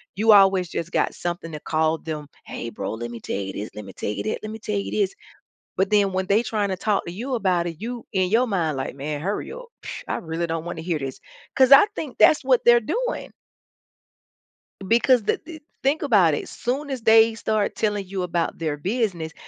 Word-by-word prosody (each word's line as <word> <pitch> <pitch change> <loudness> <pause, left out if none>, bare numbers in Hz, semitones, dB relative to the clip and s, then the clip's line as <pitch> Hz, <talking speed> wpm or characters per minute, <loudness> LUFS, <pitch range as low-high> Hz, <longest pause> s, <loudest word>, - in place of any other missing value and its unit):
you 220 +2 +4
always 195 -3 +5
just 170 0 -4
got - - +1
something 175 -1 -4
to 150 - -6
call 160 +1 0
them, 155 -2 -5 0.2
"Hey, 115 - -6
bro, 100 +1 -4
let 120 +1 -6
me 115 - -7
tell - - -4
you 95 -1 -5
this, 105 +2 -5
let 105 -1 -7
me 95 - -11
tell - - -4
you 105 - -3
this, 215 - -2
let 215 0 -6
me 220 - -6
tell 210 - -4
you 200 - -4
this," 200 -2 0 0.6
but 190 +1 +1
then 205 -2 +3
when 185 0 -1
they 210 +4 +3
tryna 200 -4 -1
talk 210 -1 0
to 170 - -6
you 250 +7 -4
about 185 -6 +1
it, 165 -2 -5
you 240 +1 -5
in 185 -1 +1
your 240 +3 +3
mind, 170 - -1
like, 130 - -4
"Man, 145 +1 -4
hurry 200 +5 -3
up, - - -9 0.2
pfft, - - -7
I - - -1
really 165 +1 -3
don't 165 -1 -3
wanna 170 -2 -5
hear 165 -2 -2
this," 135 -1 -5 0.4
'cause 260 0 +5
I 345 +9 +10
think 290 -5 -5
that's 295 - +5
what 255 -2 +4
they're 240 0 +7
doing. 475 - -3 1.5
Because 235 +2 +4
the - - 0
the 320 -2 -10 0.2
think 280 +4 +1
about 200 - +4
it, - - -3
as - - -12
soon 270 +5 -3
as 265 -4 -4
they 225 0 +6
start 215 -2 -1
telling 205 -3 -1
you 190 0 -4
about 175 -1 -2
their 155 -3 -2
business 180 -3 -2
195 Hz, 225 wpm, -23 LUFS, 165-225 Hz, 1.5 s, I